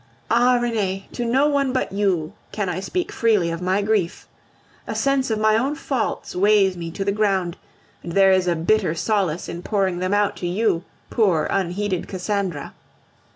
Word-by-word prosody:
Ah! 245 +2 +4
Renee, 205 -5 -2
to 240 - -3
no 260 +5 +3
one 280 -3 +1
but 255 - -1
you 190 -6 0 0.2
can 205 -3 -2
I 180 +1 -2
speak 355 - -3
freely 210 -7 +2
of 165 +1 -4
my 190 +3 +1
grief. 205 -5 -1 0.6
A - - -4
sense 275 -2 +1
of 220 - 0
my 215 0 +3
own 265 +6 +1
faults 265 -7 -3
weighs 195 0 +4
me 170 -1 -5
to 195 +4 -4
the 200 - +2
ground, 195 -4 0 0.5
and 170 - -7
there 195 0 +5
is 185 -1 +3
a 175 - +2
bitter 175 +1 +1
solace 185 -3 0
in 170 - -6
pouring 190 -3 0
them 185 +1 -1
out 205 0 +2
to 175 - -3
you, 180 -2 +1 0.3
poor, 190 -9 +2
unheeded 190 0 -1
Cassandra. 190 -4 -3
195 Hz, 180 wpm, -22 LUFS, 180-220 Hz, 0.6 s, there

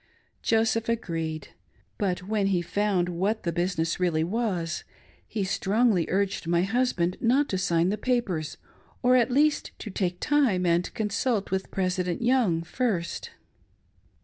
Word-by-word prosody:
Joseph 225 0 +1
agreed; 165 -9 -3 0.5
but' 185 -2 -1
when 205 0 0
he 180 -3 +1
found 195 0 0
what 190 +5 -1
the 170 - 0
business 175 -1 -1
really 170 -3 +1
was, 180 -4 -2 0.4
he 210 - -2
strongly 200 -1 +2
urged 195 -2 -1
my 170 +1 +2
husband 195 -5 0
not 265 +5 +3
to 190 - -1
sign 170 -1 +2
the 210 +1 -2
papers, 195 - -1 0.5
or, 250 +1 +5
at 245 -1 +4
least, 290 +4 +2
to 210 - -7
take 180 -2 -2
time 260 -12 +2
and 170 +1 +1
consult 210 -1 -1
with 190 0 -1
President 185 0 -1
Young 230 -10 +2
first. 185 -4 -2
190 Hz, 140 wpm, -27 LUFS, 175-225 Hz, 0.5 s, or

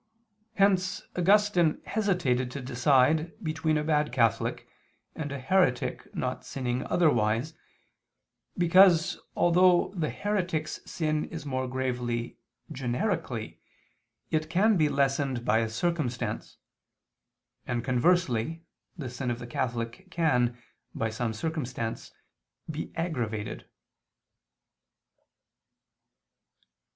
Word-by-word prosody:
Hence 190 -1 +2
Augustine 180 -3 +3
hesitated 180 - 0
to 140 - -6
decide 135 +5 +2
between 155 -1 0
a 150 - 0
bad 150 -2 +1
Catholic, 115 -4 +1 0.5
and 150 -3 -4
a 140 - -3
heretic 135 -1 +1
not - - -3
sinning 125 -1 -3
otherwise, 120 -3 +2 1.0
because 175 -1 +5 0.2
although 175 +1 +4
the 160 -4 -1
heretic's 185 -7 -2
sin 155 -2 0
is 160 -3 -8
more 130 -2 -2
grave 130 -1 -2 0.7
generically, 125 -2 -2 0.7
it 155 0 0
can 205 +6 +3
be 155 -4 +3
lessened 135 -3 0
by 110 - +3
a 115 -1 0
circumstance, 130 -1 -2 1.1
and 120 -1 -1
conversely 140 +1 +1 0.3
the 145 -6 -5
sin 125 +1 -4
of 120 - -1
the 120 - -8
Catholic 120 +8 -3
can, 125 -9 +1 0.4
by 110 0 -1
some 115 +1 -2
circumstance, 125 -3 -4 0.6
be 155 -1 -5
aggravated. 120 -11 -3
150 Hz, 100 wpm, -28 LUFS, 125-170 Hz, 1.1 s, because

